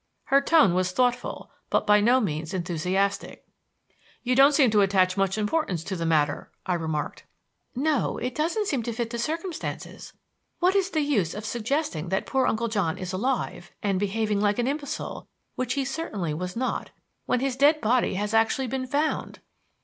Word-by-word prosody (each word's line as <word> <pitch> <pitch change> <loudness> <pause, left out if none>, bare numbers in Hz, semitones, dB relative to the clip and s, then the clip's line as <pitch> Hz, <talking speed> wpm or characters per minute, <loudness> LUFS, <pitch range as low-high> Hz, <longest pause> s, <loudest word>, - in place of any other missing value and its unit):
Her 275 0 +3
tone 280 - +5
was 185 0 +1
thoughtful 245 +1 -1 0.2
but - - +1
by 210 0 +5
no 245 +5 +4
means 160 -5 -3
enthusiastic. 185 +3 -1 0.8
"You 250 0 +1
don't 275 +2 +6
seem 265 -6 +5
to 210 -1 +4
attach 190 -2 +3
much 195 0 0
importance 210 - -1
to 190 - -4
the 165 -2 -2
matter," 150 -3 +1 0.2
I 185 - 0
remarked. 160 -3 -3 0.5
"No. 290 +2 0
It 250 +1 -3
doesn't 340 - 0
seem 275 -10 0
to 235 +1 -4
fit 230 0 -3
the 235 - -4
circumstances. 330 +7 -5 0.4
What 365 +2 +2
is 390 -1 +2
the 315 -4 0
use 225 - 0
of 210 +1 -6
suggesting 230 - -2
that 190 +1 0
poor 265 -1 +1
Uncle 230 +1 0
John 200 -8 -1
is 185 -1 -5
alive 215 -4 -2
and 195 -2 +1
behaving 205 +1 0
like 205 -1 +2
an 240 - +1
imbecile, 285 +1 -4 0.3
which 255 -1 -2
he 275 -1 0
certainly 225 - -3
was 180 +3 -4
not 255 +2 -2 0.4
when 250 - +2
his 265 0 -1
dead 290 +3 +4
body 240 -3 +1
has 205 +3 -2
actually 225 +4 +2
been 255 +1 -3
found?" 290 +4 -1
225 Hz, 180 wpm, -26 LUFS, 190-270 Hz, 0.8 s, don't